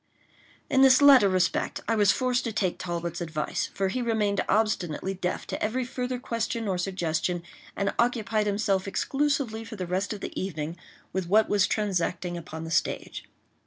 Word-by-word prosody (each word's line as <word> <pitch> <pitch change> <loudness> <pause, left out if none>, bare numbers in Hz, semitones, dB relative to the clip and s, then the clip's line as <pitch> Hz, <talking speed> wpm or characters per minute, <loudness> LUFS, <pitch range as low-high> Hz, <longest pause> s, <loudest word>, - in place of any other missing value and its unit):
In 265 - +3
this 265 -1 +7
latter 275 -8 +7
respect 185 -1 0
I 225 - +2
was 205 -3 +4
forced 255 0 0
to 230 - -1
take 195 -4 -1
Talbot's 170 0 -4
advice; 155 -2 -2
for 195 -1 -1
he 255 +6 -2
remained 215 -4 +1
obstinately 195 -4 0
deaf 180 -1 -3
to - - -5
every 245 +4 0
further 250 0 -3
question 230 -2 -3
or 185 -2 -1
suggestion, 175 -2 -1 0.3
and 200 0 -1
occupied 220 -3 +1
himself 200 -2 0
exclusively 270 -1 0
for 225 0 -8
the 185 -3 -4
rest 185 +3 -1
of 210 -2 -5
the - - -4
evening 165 -3 -4 0.4
with 190 -2 -2
what 215 +2 +5
was 200 -2 +3
transacting 180 -4 -1
upon 160 -1 -7
the 165 - -6
stage. - - -1
200 Hz, 170 wpm, -27 LUFS, 180-230 Hz, 0.4 s, this